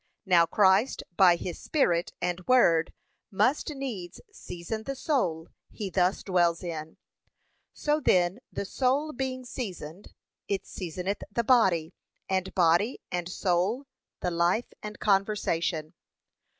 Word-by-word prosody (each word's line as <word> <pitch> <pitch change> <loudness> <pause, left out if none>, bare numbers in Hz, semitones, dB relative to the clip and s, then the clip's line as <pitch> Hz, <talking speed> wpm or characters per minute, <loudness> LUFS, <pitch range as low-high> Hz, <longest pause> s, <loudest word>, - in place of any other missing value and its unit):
Now 175 -3 +5
Christ 200 +6 +3
by 180 -2 +6
his 170 0 -6
Spirit 175 - +1
and 180 0 -3
word 175 -10 +4 0.4
must 255 +11 +1
needs 250 - -6
season 180 - -6
the 275 - -3
soul 180 - -1 0.2
he 200 -3 -6
thus 180 +2 +1
dwells 175 -2 +1
in: 160 -2 -6 0.7
so 300 +1 0
then 180 -6 +2
the - - -4
soul 275 +8 0
being 255 0 -4
seasoned, 195 - -7 0.4
it 200 -1 -2
seasoneth 180 +3 -4
the 235 +3 0
body; 190 -10 +3 0.3
and 190 0 -1
body 180 +7 +3
and 175 -1 -2
soul, 190 +8 0 0.4
the 180 - -1
life 175 +7 +1
and 210 0 -7
conversation. 195 -6 0
190 Hz, 125 wpm, -28 LUFS, 175-235 Hz, 0.7 s, by